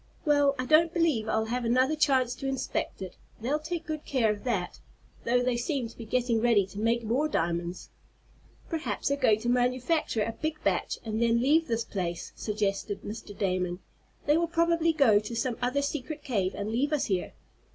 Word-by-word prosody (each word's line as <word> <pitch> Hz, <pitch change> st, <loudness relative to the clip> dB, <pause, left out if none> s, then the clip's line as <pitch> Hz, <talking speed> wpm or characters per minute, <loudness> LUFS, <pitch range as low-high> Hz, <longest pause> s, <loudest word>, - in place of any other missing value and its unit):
Well, 290 Hz, -2 st, +4 dB
I 255 Hz, -, -2 dB
don't 315 Hz, +4 st, +5 dB
believe 315 Hz, -11 st, +1 dB
I'll 220 Hz, 0 st, +1 dB
have 250 Hz, 0 st, -1 dB
another 255 Hz, +5 st, +2 dB
chance 265 Hz, -5 st, +2 dB
to 270 Hz, -, -5 dB
inspect 265 Hz, -6 st, -3 dB
it. 185 Hz, -, -9 dB, 0.2 s
They'll 270 Hz, +7 st, 0 dB
take 325 Hz, +1 st, -4 dB
good 310 Hz, -1 st, -4 dB
care 240 Hz, -6 st, +1 dB
of 210 Hz, -1 st, -5 dB
that, 205 Hz, -8 st, -2 dB, 0.5 s
though 245 Hz, +1 st, +2 dB
they 250 Hz, -1 st, +1 dB
seem 250 Hz, 0 st, -1 dB
to -, -, -15 dB
be 230 Hz, -, -8 dB
getting 235 Hz, -1 st, +1 dB
ready 225 Hz, -5 st, +4 dB
to 195 Hz, +2 st, -9 dB
make 230 Hz, +2 st, +1 dB
more 250 Hz, +8 st, +1 dB
diamonds." 170 Hz, -, -2 dB, 0.8 s
"Perhaps 320 Hz, -3 st, -2 dB
they're 280 Hz, -, +2 dB
going 215 Hz, -5 st, +3 dB
to 240 Hz, -, -1 dB
manufacture 250 Hz, 0 st, +1 dB
a 225 Hz, -, -2 dB
big 310 Hz, +5 st, -3 dB
batch, -, -, 0 dB
and 220 Hz, 0 st, -2 dB
then 235 Hz, 0 st, +3 dB
leave 305 Hz, +6 st, +3 dB
this 230 Hz, -1 st, 0 dB
place," 175 Hz, -3 st, -4 dB
suggested 205 Hz, -1 st, -2 dB
Mr. 205 Hz, -1 st, -8 dB
Damon. 180 Hz, -2 st, -1 dB, 0.5 s
"They 295 Hz, +2 st, +4 dB
will 340 Hz, 0 st, +1 dB
probably 335 Hz, 0 st, +2 dB
go 255 Hz, -10 st, +5 dB
to 220 Hz, +3 st, -6 dB
some 245 Hz, 0 st, -1 dB
other 255 Hz, +3 st, +1 dB
secret 295 Hz, +1 st, -4 dB
cave, 200 Hz, -8 st, -1 dB
and 205 Hz, +1 st, -3 dB
leave 280 Hz, +7 st, 0 dB
us 295 Hz, -, +1 dB
here." 190 Hz, -3 st, -2 dB
245 Hz, 195 wpm, -28 LUFS, 215-290 Hz, 0.8 s, don't